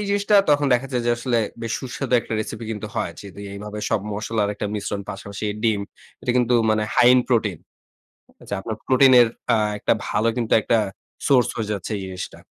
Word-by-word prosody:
এই 210 - -2
জিনিসটা 205 +1 +3
তখন 145 0 +3
দেখা 125 +2 0
যায় 125 - 0
যে - - +3
আসলে 120 -1 0 0.2
বেশ 115 - -3
সুস্বাদু 130 0 -3
একটা - - -8
রেসিপি 115 +1 -5
কিন্তু 105 - -5
হয়। - - -2
যেহেতু 100 0 -10
এইভাবে 105 +1 -7
সব 115 - +2
মসলার 105 -1 -1
একটা 105 - -3
মিশ্রণ 100 -1 -3
পাশাপাশি 100 +1 -6 0.2
ডিম, 110 -3 +2 0.4
এটা 120 - 0
কিন্তু 125 0 +3 0.2
মানে 110 0 +2
হাই 120 - +6
এন্ড 125 - +4
প্রোটিন। 110 -8 +1 0.8
আ - - -13
যে - - -3
আপনার 110 +2 -4
প্রোটিন 130 0 +6
এর 120 - +5 0.3
আ - - +4 0.2
একটা - - +2
ভালো 110 +2 +1
কিন্তু 115 -2 0
একটা 115 - +2 0.5
সোর্স 130 -4 +4
হয়ে 110 -2 -3
যাচ্ছে 100 +1 -4
এই 100 - -5
জিনিসটা। 95 0 -7
115 Hz, 200 wpm, -22 LUFS, 105-125 Hz, 0.8 s, হাই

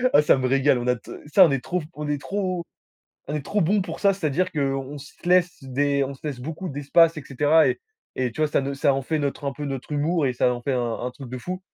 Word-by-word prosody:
Heu, 255 - +3
ah, 145 - +7
ça 150 - +5
me 130 - 0
régale, 135 0 +3
on 120 - -4
a 125 0 +2
t - - -14 0.2
ça, 185 +6 +7
on 165 - +4
est 135 -2 -1
trop 180 -2 -2
on 150 0 -5
est 145 -1 -1
trop 185 -1 -2 0.6
on 150 - -4
est 150 -2 -3
trop 205 - 0
bons 195 +4 +2
pour 185 - -7
ça, 200 -1 +4
c'est-à-dire 180 +1 0
qu'on 135 -1 -2
se 145 +1 -12 0.2
laisse 180 -1 +3
des 140 +2 0
on 135 +1 -5
se 130 - -18
laisse 140 -4 -4
beaucoup 160 +7 -5
d'espace 155 +3 +3
et 155 - -5
cetera 150 +4 +4
et - - -2 0.4
et 125 -2 -1
tu 135 - -6
vois 155 - +3
ça - - +1
ne 135 +1 -3
ça 140 0 +2
en 135 - -1
fait 155 +4 -1
notre 145 -1 -3
un 140 - -1
peu 145 +2 -6
notre 135 +1 -5
humour 150 +1 +1
et 130 - +1
ça 125 0 +2
en 120 - -7
fait 140 - -1
un 120 -2 0
un 125 - -3
truc 135 -3 -10
de 130 - -5
fou 180 +8 -5
145 Hz, 285 wpm, -24 LUFS, 135-165 Hz, 0.6 s, ah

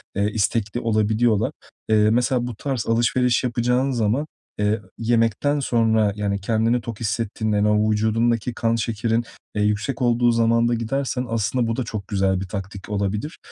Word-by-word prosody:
eee, 100 +1 +1
istekli 110 +1 0
olabiliyorlar. 110 0 +1 0.4
Eee, 105 -1 +4
mesela 125 +2 +1
bu 120 - -6
tarz 130 0 -3
alışveriş 120 +2 +2
yapacağın 125 +2 +1
zaman, 120 +4 0 0.3
eee, 105 +1 +1 0.2
yemekten 115 +5 +1
sonra, 110 -5 +2
yani, 100 -1 -1
kendini 115 +3 +1
tok 115 -1 -7
hissettiğinde, 110 0 -1
hani, 105 +1 +2
o 105 +1 +2
vücudundaki 115 +2 +1
kan 115 0 0
şekerin, 115 +1 0 0.3
eee, 105 - 0
yüksek 105 +5 -1
olduğu 120 0 +3
zamanda 115 +1 +2
gidersen 125 +2 -2
aslında 115 +2 0
bu 115 - -1
da 130 - -1
çok 110 -4 -6
güzel 95 -2 +1
bir 95 - -5
taktik 95 +1 -7
olabilir. 105 +7 -2
115 Hz, 155 wpm, -22 LUFS, 105-120 Hz, 0.4 s, Eee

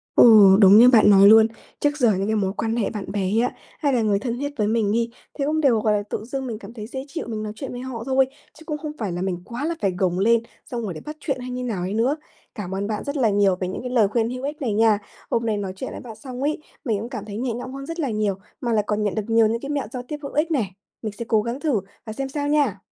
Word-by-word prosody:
Ồ, 210 -5 +8
đúng 200 +1 +8
như 240 +2 +9
bạn 220 -4 +6
nói 200 0 +8
luôn, 220 +1 +8 0.3
trước 290 0 +1
giờ 245 -7 +4
những 195 0 -1
cái 220 +1 +1
mối 195 -2 0
quan 225 +1 -1
hệ 230 - 0
bạn 205 -3 -6
bè 205 - -1
ấy 195 +4 +1
ạ, 245 - 0 0.2
hay 285 -3 +1
là 245 -3 +2
người 205 -2 +2
thân 235 +3 -3
thiết 285 +1 -2
với 210 - +2
mình 215 -1 +1
đi, 230 +1 0 0.3
thế 280 - 0
cũng 310 +1 +1
đều, 255 -7 +3
gọi 215 0 +2
là, 205 -1 +1
tự - - -3
dưng 265 +3 -4
mình 225 -4 -4
cảm 230 - -11
thấy 215 -3 -7
dễ 265 +3 -6
chịu, 330 +3 -5
mình 220 -2 -4
nói 210 -1 -4
chuyện 270 - -6
với 245 - -6
họ 250 -3 -6
thôi, 265 +1 +3 0.3
chứ 320 - -14
cũng 300 -2 -3
không 300 -1 -5
phải 205 -6 -3
là 175 +1 -3
mình 180 -2 -2
quá 240 +7 -5
là 335 +2 -1
phải 195 -3 +1
gồng 180 -2 +1
lên, 230 +4 +4 0.2
xong 240 -2 -5
rồi 195 -6 -4
để 155 - -8
bắt 300 0 -6
chuyện 270 -3 -2
hay 250 0 -6
như 250 0 -4
nào 215 -7 -2
ấy 185 +3 -3
nữa. 245 +7 +2 0.4
Cảm 190 -5 -5
ơn 195 +1 -2
bạn 210 0 -3
rất 285 +1 -3
là 240 -6 +3
nhiều 200 -2 +3
về 185 0 -3
những 185 - -5
cái 250 - -5
lời 230 -5 +3
khuyên 230 +2 0
hữu 255 +1 -5
ích 295 +3 -4
này 235 -5 0
nha. 220 -1 +4 0.3
Hôm 230 0 0
nay 220 -2 +1
nói 195 -2 -3
chuyện 260 - -5
với - - -7
bạn 225 -3 -10
xong 255 +3 -8
ấy, 300 +2 0 0.3
mình 225 -6 0
cũng 230 - -5
cảm 210 - -6
thấy 205 -1 -7
nhẹ 245 0 -1
nhõm 245 +3 -6
hơn 275 0 -7
rất 330 +2 -5
là 280 -5 -1
nhiều, 210 -2 0 0.3
mà 240 -3 -1
lại 210 -2 +2
còn 210 0 0
nhận 205 -2 0
được 215 - -1
nhiều 225 0 +4
những 230 +2 -1
cái 275 - -6
mẹo 285 -4 -1
giao 250 - -4
tiếp 300 - -3
hữu 280 - -6
ích 310 +3 +1
này, 230 - 0 0.3
mình 215 -2 -3
sẽ 220 +3 -6
cố 220 -2 +3
gắng 235 +4 -4
thử 290 -10 +1 0.3
và 220 - -5
xem 270 +4 -4
sao 285 +1 -3
nha. 290 -9 +2
230 Hz, 315 wpm, -23 LUFS, 210-265 Hz, 0.4 s, như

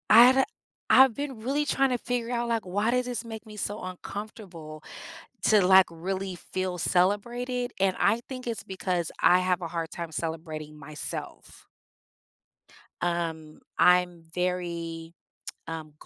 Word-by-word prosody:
I've 250 +4 +8 0.5
I've 265 -2 +7
been 280 -5 -4
really 275 +6 0
trying 270 -2 +2
to 250 - +1
figure 240 0 -2
out, 240 -1 -1
like, 230 -3 0
why 205 +5 0
does 250 0 +1
this 245 -2 -3
make 225 -1 -8
me 215 -1 -11
so 210 +1 -3
uncomfortable 185 -4 -8 0.6
to, 210 -4 +5
like, 190 0 +8
really 185 +3 -4
feel 185 +1 -4
celebrated? 240 +8 0
And 190 -1 +2
I 215 +4 +3
think 255 -1 -7
it's 230 -2 -3
because 185 -3 -2
I 180 - +6
have 185 0 +1
a 170 - -4
hard 165 -1 -3
time 170 -2 -6
celebrating 155 -1 -5
myself. 150 +1 -8 1.3
Um, 165 -3 -2 0.2
I'm 180 -1 +4
very, 170 -2 -3 0.6
um, 160 -2 -6
185 Hz, 140 wpm, -27 LUFS, 170-235 Hz, 1.3 s, I've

